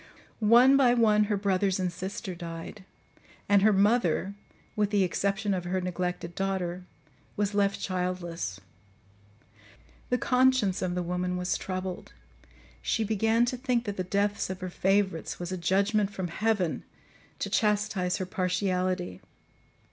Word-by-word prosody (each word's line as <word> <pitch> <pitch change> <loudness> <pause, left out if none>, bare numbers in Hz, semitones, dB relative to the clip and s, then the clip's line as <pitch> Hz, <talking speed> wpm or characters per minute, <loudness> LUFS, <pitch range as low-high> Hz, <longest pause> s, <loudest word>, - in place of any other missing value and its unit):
"One 240 +5 +6
by 250 -3 +5
one, 215 -3 +4
her 205 -1 0
brothers 195 -1 +1
and 180 -2 -1
sister 190 +2 -5
died; 170 +3 -8 0.6
and 200 -1 +5
her 215 +2 +5
mother, 200 -2 +2 0.4
with 210 -1 +1
the 205 -2 +2
exception 200 +3 0
of 180 -2 -2
her 185 +1 -1
neglected 180 -1 -3
daughter, 185 -1 -2 0.5
was 205 0 0
left 200 -1 +1
childless. 180 - -3 1.5
The 250 - +2
conscience 250 -7 +2
of 180 -1 -1
the 180 - -1
woman 180 +1 -2
was 180 0 -1
troubled; 185 -1 -5 0.7
she 225 - 0
began 225 +2 +2
to 250 +1 -2
think 245 -2 0
that 205 -1 -4
the 185 - -1
deaths 200 +2 0
of 190 0 -5
her 185 -1 -4
favourites 190 -2 0
was 175 +1 -5
a - - -1
judgement 200 +4 +1
from 190 -3 -4
heaven 200 -2 0 0.5
to - - -4
chastise 210 -4 +1
her 185 - -3
partiality. 185 - -1
195 Hz, 140 wpm, -28 LUFS, 180-210 Hz, 1.5 s, One